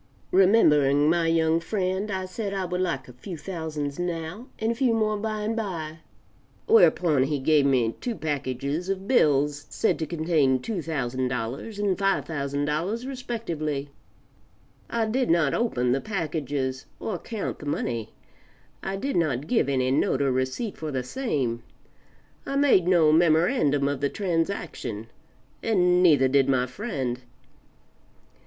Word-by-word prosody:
Remembering 150 -7 +5
my 170 -1 +2
young, 165 0 +3
friend, 190 +2 -2
I 190 -2 -2
said 200 +2 -4
I 190 -1 -1
would 180 +1 -2
like 135 -8 -2
a 125 - -12
few 170 +8 -8
thousands 155 -4 -5
now, 175 +6 -4
and 220 +1 0
a - - 0
few 235 -1 +1
more 215 -1 +1
by 215 0 -3
and 215 +2 -1
by; 165 -8 -4 0.7
whereupon 180 - +4
he 145 +3 +1
gave 140 +1 +3
me 120 -4 +2
two 240 -2 -2
packages 145 +2 -3
of 195 0 -3
bills 145 - +2
said - - 0
to 160 - -2
contain 155 -5 +2
$2,000 140 - -3 0.6
and 205 -3 0
$5,000 160 - -1
respectively; 170 - -4 1.0
I 230 -1 0
did 250 +4 0
not 165 -4 +3
open 125 - 0
the 135 +2 +1
packages 145 -8 -3
or 195 -6 -3
count 220 -3 -5
the 145 - -8
money; 115 -6 -2 0.7
I 195 - -3
did 270 +8 -3
not 150 -5 0
give 230 - +1
any 130 -1 +1
note 135 - +1
or 135 - +2
receipt 130 - -2
for 155 - -5
the 130 -2 -2
same; 130 - -2 0.8
I 275 - -4
made 275 -11 +4
no 170 -4 +5
memorandum 160 - +3
of 140 -1 -2
the 140 - +1
transaction, 165 - -3 0.5
and 180 -5 +3
neither 145 -7 +5
did 135 0 +3
my 125 -2 +2
friend. 130 - -4
160 Hz, 145 wpm, -26 LUFS, 140-195 Hz, 1.0 s, Remembering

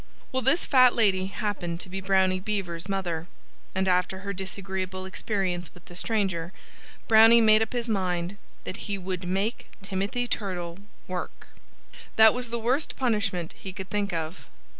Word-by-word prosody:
Well, 260 - 0
this 270 +8 +3
fat 255 -3 +6
lady 190 -5 +3
happened 190 -4 -3
to - - -6
be 190 +1 -5
Brownie 190 -1 +3
Beaver's 185 -3 -3
mother. 175 -4 -2 0.5
And 190 0 +1
after 180 +1 +1
her 200 0 -4
disagreeable 190 0 -4
experience 190 -2 -2
with 175 - -16
the 175 - -12
stranger, 185 -4 -1 0.6
Brownie 225 +1 +8
made 215 -1 +6
up 225 - -1
his 240 -1 -2
mind 185 -3 -1 0.3
that 185 - -6
he 200 - 0
would 185 -1 -4
make 195 +5 -2
Timothy 200 +5 -2
Turtle 180 -5 -3 0.3
work. 180 -1 -6 0.7
That 220 0 +8
was 250 -1 -4
the 235 - -2
worst 250 +6 0
punishment 205 -9 0
he 190 - -8
could 190 0 -8
think 205 -1 0
of. 165 +1 -4
190 Hz, 160 wpm, -27 LUFS, 180-220 Hz, 0.7 s, Brownie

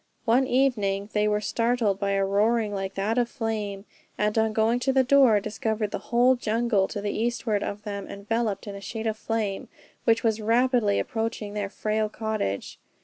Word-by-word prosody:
One 245 +3 +3
evening, 215 -6 +1
they 210 0 +2
were 210 0 +1
startled 230 -3 0
by 200 -1 0
a 195 0 +2
roaring 210 +2 +1
like 195 -1 -4
that 215 +5 0
of 240 -1 +1
flame, 210 -4 -3 0.3
and 210 0 0
on 220 -1 +2
going 220 +2 +2
to 265 +2 +1
the 265 0 +4
door, 255 -5 +5
discovered 215 0 -2
the - - -3
whole 245 +2 +5
jungle 225 -4 +1
to 205 - -5
the 205 0 -2
eastward 230 -2 -1
of 205 +1 -4
them 200 -2 -5
enveloped 205 0 -2
in 200 -1 -7
sheets 220 +3 -3
of 215 - -2
flame, 215 -3 -3 0.4
which 230 -1 +3
was 220 -1 +1
rapidly 230 -1 +2
approaching 225 -2 -3
their 205 -1 -3
frail 215 +1 -1
cottage. 215 - -3
220 Hz, 180 wpm, -26 LUFS, 205-230 Hz, 0.4 s, door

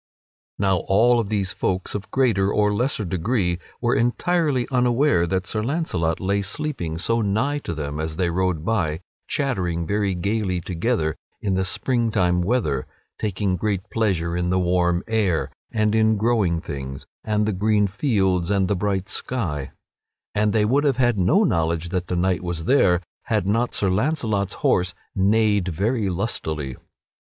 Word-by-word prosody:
Now 95 -2 +2
all 115 +4 +4
these 100 -2 -1
folk 95 0 -2
of 100 -1 -5
greater 110 -7 +2
or 105 0 +2
lesser 115 -1 0
degree 90 0 0 0.2
were 120 0 +1
entirely 140 +2 +1
unaware 125 - +3
that 95 +2 -1
Sir 110 - -2
Launcelot 110 - -1
lay 100 +1 0
sleeping 100 - -3
so 115 +7 0
nigh 110 +9 0
to 85 - -5
them 75 0 -4
as 80 0 -3
they 90 -1 0
rode 90 -3 -1
by 90 -8 0 0.3
chattering 90 - -1
very 100 0 0
gayly 100 0 -1
together 85 - -1 0.2
in 100 - -1
the 95 0 +1
spring 120 +5 0
time 90 -4 +2
weather, 85 - 0 0.3
taking 100 -2 -1
great 100 +1 -2
pleasure 90 -7 0
in 90 0 -1
the 90 - +2
warm 90 0 +1
air, 105 -7 0 0.2
and 110 -1 +1
in 110 -1 +3
growing 105 -7 +1
things, 65 -4 -6 0.2
and 105 -1 +1
the 110 - 0
green 105 +2 +2
fields, 95 - +1
and 100 -2 +2
the 100 - +1
bright 95 0 -1
sky; 85 - -2 0.6
and 105 0 +2
they 105 -1 +2
would 135 +7 +2
have 140 -4 +2
had 120 -5 +2
no 165 - +4
knowledge 85 - 0
that 90 0 -2
the 90 - -2
knight 90 0 +1
was 85 -2 -4
there, 90 -9 +4 0.2
had 105 -5 0
not 115 +5 0
Sir 100 -2 +1
Launcelot's 110 - 0
horse 90 0 +2 0.2
neighed 105 0 +2
very 100 +5 0
lustily. 80 - -3
100 Hz, 160 wpm, -23 LUFS, 90-115 Hz, 0.6 s, all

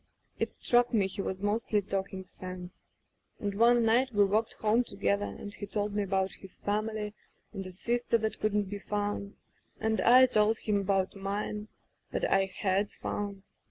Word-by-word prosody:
It - - 0
struck 240 0 +2
me 205 -3 +4
he 195 +1 -3
was 190 0 -4
mosdy 210 +1 +1
talking 190 -1 -3
sense. 185 0 -9 0.5
And 205 -1 -2
one 235 +2 +5
night 245 +4 +3
we 205 -2 +4
walked 215 +3 +1
home 220 +3 +2
together 200 -1 0
and 205 - -8
he 205 - -6
told 205 0 -2
me 205 - +1
about 190 -1 0
his 190 - -11
family, 210 0 -2 0.4
and 195 -2 -4
the 185 - -8
sister 235 +5 +1
that 220 -1 -2
couldn't 210 -1 +1
be 200 +1 -6
found, 205 0 -3 0.4
and 220 0 +1
I 255 +2 +8
told 215 -2 +3
him 210 -2 0
about 195 0 0
mine 205 +2 -3 0.4
that - - 0
I 195 0 +4
had 195 +1 0
found. 200 -1 -5
205 Hz, 170 wpm, -30 LUFS, 195-220 Hz, 0.5 s, I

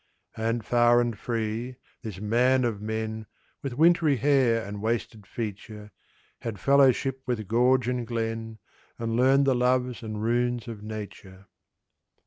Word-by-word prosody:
And, 115 0 -2
far 120 0 +4
and 120 -2 0
free, 115 +3 -3 0.3
this 110 -6 -7
man 125 +5 +2
of 110 -4 -2
men, 110 0 -4 0.3
With 135 -3 -5
wintry 165 -2 +4
hair 120 -3 +2
and 100 0 -7
wasted 110 -2 -3
feature, 105 -1 -7 0.5
Had 110 -4 -6
fellowship 135 0 +3
with 110 -5 -2
gorge 125 +3 +3
and 125 -2 -2
glen, 115 -1 -3 0.4
And 115 -1 -2
learned 135 +3 +4
the 135 - +3
loves 125 0 +1
and 110 -2 -5
runes 120 0 0
of 110 -3 -7
Nature. 100 -3 -9
115 Hz, 135 wpm, -26 LUFS, 110-125 Hz, 0.5 s, far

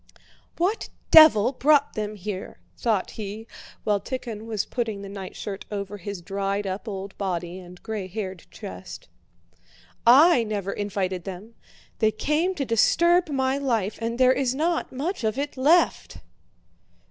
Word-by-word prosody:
"What 375 +6 0 0.2
devil 280 -8 +8
brought 285 +1 +3
them 215 0 -4
here?" 195 -1 -6 0.2
thought 220 -5 0
he, 215 +1 -7 0.4
while 205 -2 +1
Tíkhon 230 -4 -6
was 215 -3 -2
putting 220 -5 -3
the 200 - -7
nightshirt 195 0 -7
over 205 0 -5
his 200 -1 -7
dried 195 +2 -2
up 195 +4 -4
old 195 -1 -6
body 180 -2 -3
and 180 -1 -13
gray 215 -4 -4
haired 190 -2 -6
chest. 90 0 -9 0.9
"I 265 +2 +7
never 205 -3 -3
invited 190 -3 -2
them. 195 +4 -8 0.5
They 220 - +4
came 305 - 0
to 280 - -2
disturb 340 - +3
my 265 -1 0
life—and 230 -2 -1
there 255 0 +5
is 260 -1 0
not 330 +4 0
much 295 +4 -3
of 220 +1 0
it 285 +1 -3
left." 300 +7 +2
215 Hz, 140 wpm, -25 LUFS, 195-265 Hz, 0.9 s, devil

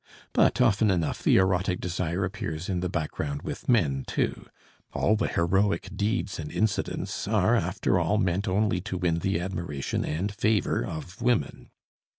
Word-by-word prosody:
But - - +3
often 110 -3 +4
enough 85 -4 0
the - - +4
erotic 95 -1 +2
desire 90 +1 -1
appears 90 -3 -4
in 90 -2 0
the 90 0 -2
background 75 -3 -3
with - - -6
men 75 - +3
too; - - -2 0.5
all 110 - +2
the 110 - 0
heroic 95 +4 +1
deeds 105 -2 -1
and 75 -2 -5
incidents 110 -2 -1
are - - +3
after - - +1
all 105 - +1
meant 95 0 0
only 95 -1 +1
to 95 -1 -4
win 85 -2 +1
the 95 0 0
admiration 85 -6 -3
and 90 +7 -2
favor 110 -1 +1
of 85 +6 -7
women. 120 - 0
95 Hz, 160 wpm, -27 LUFS, 85-105 Hz, 0.5 s, often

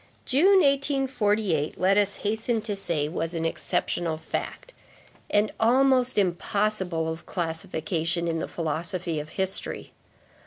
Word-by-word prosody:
June, 370 +8 +5
1848, 250 - +1
let 190 +2 +3
us 205 -1 +2
hasten 220 +2 0
to 215 -1 -4
say, 165 -6 -1
was 165 +1 -3
an 165 0 -2
exceptional 165 0 -1
fact, 165 - -5 0.6
and 210 +1 +2
almost 255 +1 +3
impossible 190 -2 +1
of 160 +1 -6
classification, 170 0 -2
in 165 -1 -1
the - - -3
philosophy 165 +1 -2
of 150 +1 -7
history. 190 +3 -2
190 Hz, 120 wpm, -26 LUFS, 165-225 Hz, 0.6 s, June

